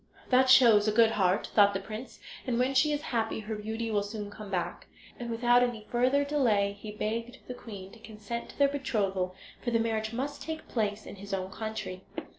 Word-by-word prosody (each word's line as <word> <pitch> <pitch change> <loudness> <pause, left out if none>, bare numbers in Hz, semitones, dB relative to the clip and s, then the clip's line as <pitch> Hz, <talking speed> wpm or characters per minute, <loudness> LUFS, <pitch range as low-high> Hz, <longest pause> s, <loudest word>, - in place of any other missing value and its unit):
"That 260 +1 +5
shows 230 -5 +7
a - - +4
good 225 +1 +5
heart," 190 -1 +1
thought 205 -1 +5
the - - 0
prince; 215 +5 -8 0.3
"and 240 -2 0
when 255 +2 +2
she 285 +3 +4
is 295 0 -1
happy 225 -2 -1
her 215 +1 -5
beauty 220 +2 -3
will 205 -1 +2
soon 205 0 -6
come 210 -1 -9
back." 180 -3 -3 0.3
And 240 -1 -5
without 240 +1 +4
any 240 -3 -1
further 255 +4 +3
delay 230 -9 +2
he 215 - -8
begged 230 +3 -3
the 250 - -4
queen 200 -6 -9
to 230 - -15
consent 220 +2 -7
to - - -13
their 280 - +5
betrothal, 195 -10 -1 0.3
for 245 - 0
the 235 - +2
marriage 220 -1 -1
must 275 +4 -4
take 320 -1 -6
place 210 -2 -2
in - - -9
his 200 0 -4
own 190 0 -4
country. 215 -4 -5
220 Hz, 210 wpm, -29 LUFS, 205-245 Hz, 0.3 s, shows